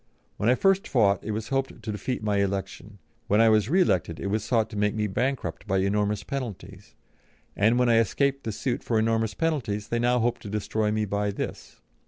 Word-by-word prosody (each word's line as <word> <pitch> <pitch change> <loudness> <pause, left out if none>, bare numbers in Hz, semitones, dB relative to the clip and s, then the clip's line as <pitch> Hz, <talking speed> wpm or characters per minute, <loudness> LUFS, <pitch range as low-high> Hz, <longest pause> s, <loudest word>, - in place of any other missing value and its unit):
When 105 - +1
I 125 - +5
first 195 +5 +2
fought 100 -6 +2
it - - -6
was 110 +1 -3
hoped 135 -4 -2
to 110 - -3
defeat 105 +3 -4
my 105 -1 +1
election. 100 +1 -3 0.3
When 105 - +3
I 115 0 +6
was 110 0 +3
re 185 +5 +4
elected 85 - 0
it 100 - -3
was 110 0 0
sought 115 -2 +1
to - - -7
make 105 +1 0
me 105 -1 0
bankrupt 110 -3 -2
by 95 -1 +1
enormous 105 +1 0
penalties, 125 -7 -7 0.6
and 110 +4 +3
when 125 0 +3
I 115 -1 +5
escaped 140 +5 0
the 110 - -3
suit 120 +4 -2
for 115 - -1
enormous 110 0 +1
penalties 115 -11 -2
they 120 - 0
hope 120 0 +2
now - - -26
to 100 - -9
destroy 105 +1 -1
me 110 0 0
by 105 0 -1
this. 100 - -6
110 Hz, 215 wpm, -26 LUFS, 100-120 Hz, 0.6 s, I